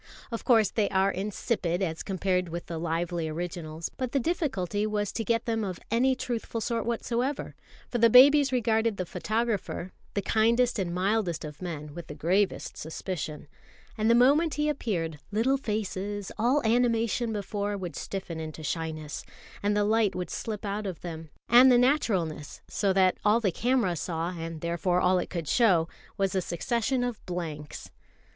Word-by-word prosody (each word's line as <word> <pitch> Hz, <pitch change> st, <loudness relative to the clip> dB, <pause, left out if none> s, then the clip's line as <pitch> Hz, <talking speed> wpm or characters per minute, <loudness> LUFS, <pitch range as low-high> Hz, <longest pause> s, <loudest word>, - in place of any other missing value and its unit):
Of 230 Hz, -, -4 dB
course, 225 Hz, -5 st, +4 dB
they 215 Hz, -3 st, +1 dB
are 190 Hz, +1 st, +2 dB
insipid 195 Hz, -2 st, -1 dB
as 165 Hz, -3 st, -2 dB
compared 185 Hz, -2 st, -1 dB
with 170 Hz, +1 st, -5 dB
the 165 Hz, -1 st, -5 dB
lively 170 Hz, 0 st, -1 dB
originals; 165 Hz, -1 st, -5 dB
but 255 Hz, -2 st, -3 dB
the 275 Hz, -, +3 dB
difficulty 215 Hz, -, -1 dB
was 210 Hz, -2 st, -1 dB
to 225 Hz, -, -3 dB
get 230 Hz, +1 st, 0 dB
them 225 Hz, -1 st, 0 dB
of 185 Hz, -4 st, -4 dB
any 255 Hz, +3 st, +3 dB
truthful 235 Hz, -2 st, -3 dB
sort 230 Hz, 0 st, -2 dB
whatsoever, 240 Hz, +4 st, -2 dB, 0.3 s
for 240 Hz, -, -2 dB
the 230 Hz, 0 st, +6 dB
babies 280 Hz, +4 st, +7 dB
regarded 225 Hz, -3 st, +1 dB
the 185 Hz, -, -2 dB
photographer 205 Hz, 0 st, -2 dB, 0.2 s
the 200 Hz, -, 0 dB
kindest 230 Hz, +3 st, +2 dB
and 180 Hz, -3 st, -1 dB
mildest 185 Hz, -2 st, 0 dB
of 150 Hz, +2 st, -9 dB
men 150 Hz, -5 st, -5 dB
with 170 Hz, 0 st, -8 dB
the 150 Hz, -, -7 dB
gravest 185 Hz, +7 st, 0 dB
suspicion: 160 Hz, -2 st, -5 dB, 0.5 s
and 220 Hz, 0 st, +1 dB
the 230 Hz, -, +6 dB
moment 290 Hz, +7 st, +4 dB
he 300 Hz, 0 st, +1 dB
appeared, 170 Hz, -, -2 dB
little 230 Hz, +6 st, +2 dB
faces, 205 Hz, -4 st, -3 dB
all 250 Hz, +6 st, +2 dB
animation 230 Hz, 0 st, +2 dB
before, 205 Hz, 0 st, -2 dB
would 175 Hz, -6 st, -6 dB
stiffen 185 Hz, -4 st, -5 dB
into 155 Hz, 0 st, -6 dB
shyness, 155 Hz, -1 st, -4 dB, 0.4 s
and 205 Hz, +1 st, +1 dB
the 205 Hz, -, +3 dB
light 215 Hz, -1 st, +2 dB
would 180 Hz, -2 st, -4 dB
slip 215 Hz, -1 st, -4 dB
out 205 Hz, +1 st, -2 dB
of 185 Hz, -4 st, -6 dB
them, 160 Hz, -2 st, -7 dB, 0.2 s
and 250 Hz, +2 st, +8 dB
the 245 Hz, -, +6 dB
naturalness, 195 Hz, -, +1 dB
so 200 Hz, -2 st, 0 dB
that 185 Hz, -1 st, +3 dB
all 210 Hz, +2 st, +4 dB
the 205 Hz, -5 st, +1 dB
camera 235 Hz, -3 st, +1 dB
saw, 165 Hz, +1 st, -2 dB
and 165 Hz, -2 st, -6 dB
therefore 175 Hz, +1 st, 0 dB
all 180 Hz, 0 st, +3 dB
it -, -, -4 dB
could 170 Hz, -4 st, -4 dB
show, 175 Hz, -, +4 dB, 0.3 s
was 195 Hz, -1 st, +1 dB
a 190 Hz, -, +1 dB
succession 235 Hz, +9 st, -1 dB
of 245 Hz, -3 st, -4 dB
blanks. 160 Hz, -5 st, -5 dB
200 Hz, 170 wpm, -28 LUFS, 170-230 Hz, 0.5 s, and